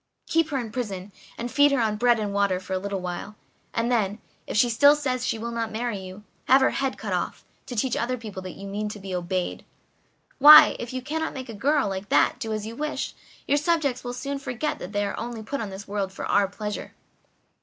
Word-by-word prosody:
Keep 330 -1 +1
her 285 - -1
in 235 -4 -4
prison, 205 -5 -4 0.3
and 240 +1 -4
feed 285 0 +5
her 275 - +2
on 220 -2 +1
bread 240 +2 +3
and 205 -2 -2
water 200 -2 +2
for 185 0 -6
a 185 - 0
little 200 0 -3
while, 180 +4 -5 0.4
and 235 +1 0
then, 210 -4 +1 0.3
if - - -2
she 245 - +5
still 285 +5 +6
says 255 -4 -2
she - - 0
will 235 +2 -4
not 230 -1 -2
marry 225 -1 -2
you, 190 +2 -10 0.2
have 265 - +6
her 265 - +3
head 270 -1 -2
cut - - -4
off, - - -3 0.2
to 245 - -6
teach 240 +2 0
other 250 +2 -1
people 215 -5 -7
that 185 -1 -8
you 195 - -8
mean 210 +2 -3
to 210 - -7
be 190 -1 -6
obeyed. 180 0 -2 0.8
Why, 305 +2 +10
if 240 - -5
you 255 -1 -4
cannot 320 +3 -3
make 260 -2 -6
a - - -6
girl 280 +4 +1
like 195 +1 -5
that - - +3
do 220 - -4
as 215 -1 -3
you 225 +1 -7
wish, 300 +3 -3 0.3
your 285 +1 +3
subjects 300 -5 0
will 245 -1 -4
soon 275 +3 -4
forget 270 +2 -3
that 180 - -7
they 205 0 0
are - - -3
only 230 -1 -5
put 275 +5 -4
into 215 - -4
this 195 +1 -9
world 200 -2 -2
for 190 - -6
our 200 -1 +3
pleasure." 210 +1 -6
230 Hz, 240 wpm, -25 LUFS, 200-260 Hz, 0.8 s, Why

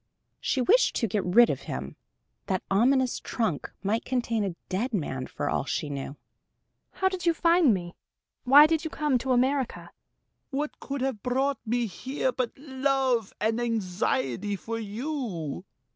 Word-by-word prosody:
She 265 - 0
wished 485 - +4
to 230 - +1
get 205 0 -1
rid 230 +7 +5
of 135 - -4
him: 65 +1 -5 0.5
that 190 - -1
ominous 255 +5 +3
trunk 220 - -2
might 215 +4 0
contain 235 -4 -1
a 190 -4 -3
dead 220 +6 -1
man, 135 -7 -3
for - - -4
all - - 0
she 145 0 -2
knew. 140 0 -5 0.7
"How 380 - 0
did 370 -2 -2
you 335 - +4
find 335 -4 +4
me? 175 -3 -2 0.5
Why 285 +4 +9
did 320 +1 +1
you 320 - -3
come 295 -5 0
to 260 +2 -2
America?" 260 +1 0 0.6
"What 295 +1 -3
could 275 -1 -4
have 260 -6 -2
brought 265 +4 0
me 240 +1 +1
here 260 +6 -2
but 250 -2 -3
love 265 -5 0
and 220 +2 0
anxiety 195 - -1
for 225 +3 -5
you?" 215 - -4
240 Hz, 160 wpm, -27 LUFS, 195-270 Hz, 0.7 s, Why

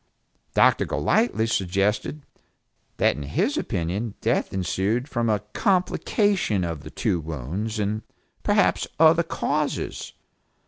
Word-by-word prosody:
Dr. - - +4
Golightly 220 - +1
suggested 105 +7 0 0.7
that - - +3
in 75 - -6
his 70 +1 0
opinion 95 +6 -2
death - - 0
ensued 95 +6 -1
from 120 -5 -1
a 105 -2 +1
complication 190 - +1
of 85 -4 -3
the 75 - -9
two 95 +2 -1
wounds 80 - -4
and 105 +1 -1 0.4
perhaps - - +2
other 165 +1 +6
causes. 150 -2 -2
105 Hz, 110 wpm, -24 LUFS, 90-145 Hz, 0.7 s, other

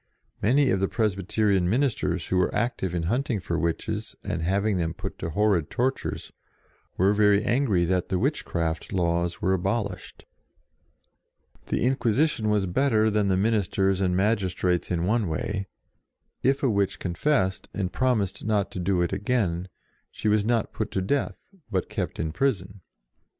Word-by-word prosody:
Many 135 +4 +3
of 95 - +2
the 95 - +1
Presby 105 -4 0
terian 100 -1 +1
ministers, 100 - 0
who 95 - 0
were 90 - +1
active 95 -7 -1
in 85 - -1
hunt 120 +11 -1
ing 110 -5 0
for 85 -2 -2
witches 105 +6 -2
and 90 -4 -3
having 100 +4 +1
them 85 -1 -1
put - - -7
to 85 - -3
horrid 95 -3 +1
tortures, 130 +2 -2 0.7
were 95 +3 +4
very 105 -1 +4
angry 115 -9 +2
that 90 0 0
the 95 - 0
withcraft 85 - -1
laws 85 0 0
were 95 -1 +3
abolished. 95 0 -3 1.4
The - - 0
In 130 +2 +3
quisition 120 0 +1
was 105 -2 +2
better 110 +2 +2
than 105 -1 +1
the 95 -1 +2
ministers 95 -2 +1
and 90 -1 +1
magistrates 95 -4 +1
in 85 -2 0
one 110 +1 +1
way: 100 +4 -3 0.7
if 135 +3 +1
a 135 - +4
witch 100 -2 0
con 90 - -3
fessed, 95 - 0
and 95 -3 -3
promised 120 -7 0
not 105 -2 0
to - - -5
do 90 0 +1
it 85 - -2
again, 95 -4 -1 0.4
she - - -4
was 105 -1 +3
not 115 0 0
put 110 -1 -3
to 95 - 0
death, 140 - -2 0.2
but 95 -4 -1
kept 100 -4 -4
in 80 -1 -1
prison. 95 -3 -1
100 Hz, 165 wpm, -26 LUFS, 90-110 Hz, 1.4 s, were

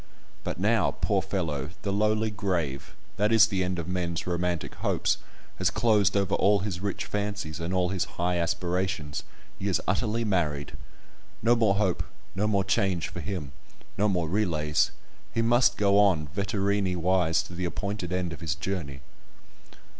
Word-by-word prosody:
But - - -4
now, - - +3
poor - - +2
fellow! 75 -7 -2
the 100 - -1
lowly 110 +1 +2
grave, 85 -10 -2 0.2
that 105 +2 +2
is 110 -3 +7
the 95 -3 -1
end 90 0 -1
of 85 - -4
men's 90 -2 -2
romantic 90 -2 -1
hopes, - - +1 0.4
has 95 -2 +3
closed 105 -1 +3
over 100 -2 +1
all 100 -1 +4
his 95 -3 -3
rich 100 0 -3
fancies, 100 -6 -3
and 85 +1 -3
all 90 -1 +2
his 95 -1 0
high 90 0 +1
aspirations; 85 -3 -1 0.4
he 100 - -2
is 95 - +2
utterly 105 +5 +1
married! 80 -8 0 0.7
No 120 +2 +5
more 110 -4 +3
hope, 95 -3 +1 0.3
no 100 +3 0
more 100 -2 +2
change 95 -3 +1
for - - -7
him—no 90 +3 -4
more 90 -4 0
relays—he 85 +3 -1
must 120 +2 +4
go 100 -1 +4
on 90 -8 +3
Vetturini 100 +1 0
wise 90 -1 +2
to - - -10
the 90 +1 -3
appointed 100 0 -3
end 90 -2 -1
of 80 - -10
his 80 -4 -1
journey! 80 -6 -4
95 Hz, 160 wpm, -27 LUFS, 85-100 Hz, 0.7 s, is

